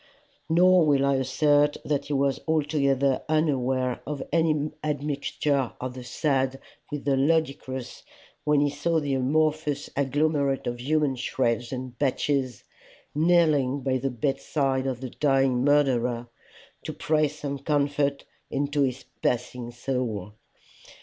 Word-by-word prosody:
Nor 180 Hz, 0 st, +5 dB
will 140 Hz, -2 st, +3 dB
I 140 Hz, -1 st, +2 dB
assert 145 Hz, +3 st, +2 dB
that 145 Hz, -1 st, -1 dB
he 145 Hz, -, -3 dB
was 140 Hz, 0 st, +1 dB
altogether 140 Hz, -4 st, +1 dB
unaware 130 Hz, -5 st, +1 dB
of 150 Hz, -1 st, -3 dB
any 155 Hz, -2 st, +2 dB
admixture 145 Hz, -2 st, -1 dB
of 130 Hz, 0 st, -4 dB
the 130 Hz, 0 st, -8 dB
sad 135 Hz, 0 st, 0 dB, 0.3 s
with 150 Hz, -2 st, -5 dB
the 140 Hz, -1 st, +3 dB
ludicrous 135 Hz, -3 st, -1 dB, 0.4 s
when 150 Hz, -1 st, +3 dB
he 145 Hz, -, +2 dB
saw 160 Hz, +3 st, 0 dB
the 145 Hz, -2 st, -2 dB
amorphous 150 Hz, +2 st, 0 dB
agglomerate 140 Hz, 0 st, +1 dB
of 120 Hz, 0 st, -3 dB
human 145 Hz, -1 st, +1 dB
shreds 120 Hz, -2 st, -1 dB
and 130 Hz, -1 st, -6 dB
patches 135 Hz, -3 st, 0 dB, 0.5 s
kneeling 150 Hz, -4 st, +3 dB
by 130 Hz, 0 st, 0 dB
the 135 Hz, +2 st, -1 dB
bedside 135 Hz, +1 st, -1 dB
of 130 Hz, -2 st, -3 dB
the 130 Hz, -2 st, -5 dB
dying 135 Hz, -3 st, +2 dB
murderer, 125 Hz, -5 st, +2 dB, 0.6 s
to -, -, -4 dB
pray 155 Hz, -1 st, +1 dB
some 145 Hz, -1 st, -5 dB
comfort 140 Hz, -1 st, 0 dB, 0.2 s
into 145 Hz, +1 st, -1 dB
his 130 Hz, -2 st, -1 dB, 0.2 s
passing 125 Hz, 0 st, -1 dB
soul. 120 Hz, -5 st, -3 dB
140 Hz, 130 wpm, -26 LUFS, 130-150 Hz, 0.6 s, Nor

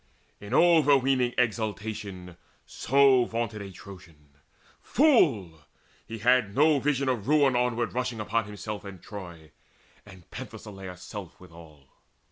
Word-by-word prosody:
In 100 Hz, -, -10 dB
overweening 135 Hz, -7 st, +3 dB
exultation 105 Hz, -5 st, -3 dB, 0.3 s
so 135 Hz, -2 st, +3 dB
Vaunted 115 Hz, -2 st, -4 dB
a 100 Hz, -1 st, -8 dB
Trojan. 85 Hz, -6 st, -14 dB, 0.5 s
Fool! 135 Hz, -, +2 dB, 0.5 s
he 115 Hz, -, -7 dB
had 115 Hz, -2 st, +2 dB
no 150 Hz, 0 st, +4 dB
vision 140 Hz, -1 st, 0 dB
Of 120 Hz, -4 st, -2 dB
ruin 145 Hz, -3 st, +3 dB
onward 120 Hz, -1 st, 0 dB
rushing 125 Hz, -2 st, -3 dB
upon 110 Hz, +1 st, -1 dB
himself 105 Hz, 0 st, -7 dB
And 100 Hz, -2 st, -10 dB
Troy, 85 Hz, -7 st, -10 dB, 0.5 s
and 95 Hz, -4 st, -16 dB
Penthesileia's 95 Hz, -3 st, -9 dB
self 100 Hz, -5 st, -9 dB
withal. 80 Hz, -5 st, -16 dB
110 Hz, 115 wpm, -27 LUFS, 95-130 Hz, 0.5 s, no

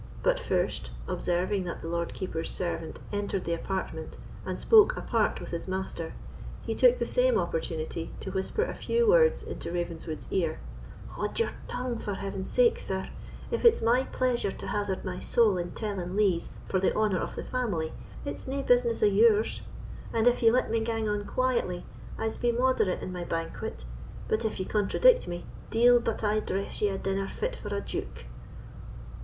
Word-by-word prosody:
But -, -, +3 dB
first, -, -, -1 dB, 0.2 s
observing 180 Hz, +2 st, 0 dB
that 170 Hz, -, -5 dB
the -, -, -4 dB
Lord 170 Hz, 0 st, -2 dB
Keeper's 165 Hz, -3 st, -1 dB
servant 170 Hz, -2 st, -2 dB
entered 205 Hz, -2 st, -1 dB
the 170 Hz, -, -1 dB
apartment 165 Hz, -2 st, -4 dB, 0.3 s
and -, -, -3 dB
spoke 445 Hz, +2 st, +6 dB
apart -, -, +1 dB
with -, -, -8 dB
his 170 Hz, +1 st, -4 dB
master, 185 Hz, -3 st, -3 dB, 0.5 s
he -, -, -2 dB
took -, -, +5 dB
the -, -, -1 dB
same -, -, +3 dB
opportunity 165 Hz, 0 st, -2 dB
to 190 Hz, -, -5 dB
whisper 190 Hz, -, -1 dB
a -, -, -3 dB
few 470 Hz, 0 st, +1 dB
words 475 Hz, +1 st, +5 dB
into -, -, -6 dB
Ravenswood's 170 Hz, -2 st, -4 dB
ear: 165 Hz, -5 st, 0 dB, 0.5 s
"Haud -, -, -4 dB
your 460 Hz, -, +1 dB, 0.2 s
tongue, 250 Hz, -2 st, -3 dB
for 205 Hz, -, -3 dB
heaven's 195 Hz, -1 st, -4 dB
sake, 485 Hz, -2 st, +4 dB
sir; -, -, -3 dB, 0.4 s
if 470 Hz, -, -1 dB
it's 465 Hz, -, +6 dB
my 240 Hz, +3 st, +4 dB
pleasure 245 Hz, -5 st, 0 dB
to -, -, -7 dB
hazard 205 Hz, -2 st, -2 dB
my 180 Hz, -1 st, -3 dB
soul 225 Hz, -5 st, +3 dB
in 175 Hz, 0 st, -3 dB
telling 195 Hz, -4 st, -3 dB
lees 195 Hz, -5 st, +2 dB, 0.2 s
for 190 Hz, -, +1 dB
the 190 Hz, -, +1 dB
honour 210 Hz, -4 st, +2 dB
of -, -, -4 dB
the -, -, -4 dB
family, 200 Hz, -11 st, -2 dB, 0.3 s
it's 285 Hz, -, -5 dB
nae 275 Hz, +1 st, -2 dB
business 245 Hz, -3 st, +3 dB
o' -, -, +8 dB
yours; 210 Hz, +1 st, +4 dB, 0.5 s
and 225 Hz, 0 st, +1 dB
if 245 Hz, 0 st, +4 dB
ye 230 Hz, -, +7 dB
let 245 Hz, -1 st, +2 dB
me 230 Hz, -, +2 dB
gang 225 Hz, -1 st, -1 dB
on 210 Hz, -1 st, -1 dB
quietly, 240 Hz, -9 st, 0 dB, 0.3 s
I'se 225 Hz, 0 st, -2 dB
be 240 Hz, -, +2 dB
moderate 245 Hz, -6 st, +1 dB
in 185 Hz, -, -5 dB
my 180 Hz, -1 st, -4 dB
banquet; 165 Hz, -, -4 dB, 0.4 s
but 220 Hz, +1 st, 0 dB
if 215 Hz, -, -2 dB
ye 185 Hz, -, -1 dB
contradict 220 Hz, -, +4 dB
me, 175 Hz, 0 st, -5 dB, 0.2 s
deil 240 Hz, +1 st, +6 dB
but 230 Hz, -1 st, -2 dB
I 210 Hz, 0 st, +2 dB
dress 195 Hz, -1 st, -3 dB
ye 210 Hz, -, +3 dB
a 195 Hz, -, -2 dB
dinner 195 Hz, 0 st, -1 dB
fit -, -, -3 dB
for -, -, -8 dB
a -, -, -2 dB
duke!" -, -, -5 dB
205 Hz, 185 wpm, -29 LUFS, 180-245 Hz, 0.5 s, o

